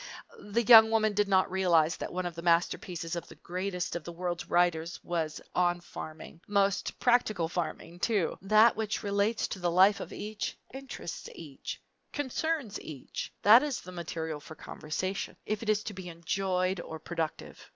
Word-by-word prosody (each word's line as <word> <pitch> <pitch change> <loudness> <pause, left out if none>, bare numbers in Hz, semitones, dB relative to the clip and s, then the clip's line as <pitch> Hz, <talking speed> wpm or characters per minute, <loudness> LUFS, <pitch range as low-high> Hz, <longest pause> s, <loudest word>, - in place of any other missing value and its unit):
The 210 +3 -1
young 220 -1 +9
woman 215 -1 +2
did 205 0 +2
not 190 -2 +3
realize 175 -3 +3
that - - -5
one 185 0 -3
of 175 - -3
the 170 - -7
masterpieces 170 0 0
of 170 - -5
the - - -13
greatest 180 0 -3
of 175 - -4
the 170 - -7
world's 175 0 -4
writers 175 -1 +1
was 165 -3 -2
on 175 -1 +2
farming 160 -1 -9
most 200 -1 +1
practical 215 -8 +2
farming, 170 0 -4
too! 200 -5 +1
That 215 +3 +5
which 220 0 -2
relates 205 +2 +1
to 190 - -5
the 175 -1 0
life 190 +4 +5
of - - -7
each, 210 0 -4 0.2
interests 270 -10 -7
each, 145 -5 -7 0.3
concerns 290 -4 -2
each 145 -5 -7
that 220 +4 +9
is 290 -3 -2
the 185 - -10
material 160 -3 -4
for 155 +2 -11
conversation, 185 +6 -4
if 215 -1 -2
it 225 - -4
is 210 0 +2
to 215 - -5
be 185 -2 -7
enjoyable 185 +2 -1
or 160 - -5
productive. 160 0 -5
185 Hz, 170 wpm, -30 LUFS, 170-210 Hz, 0.3 s, young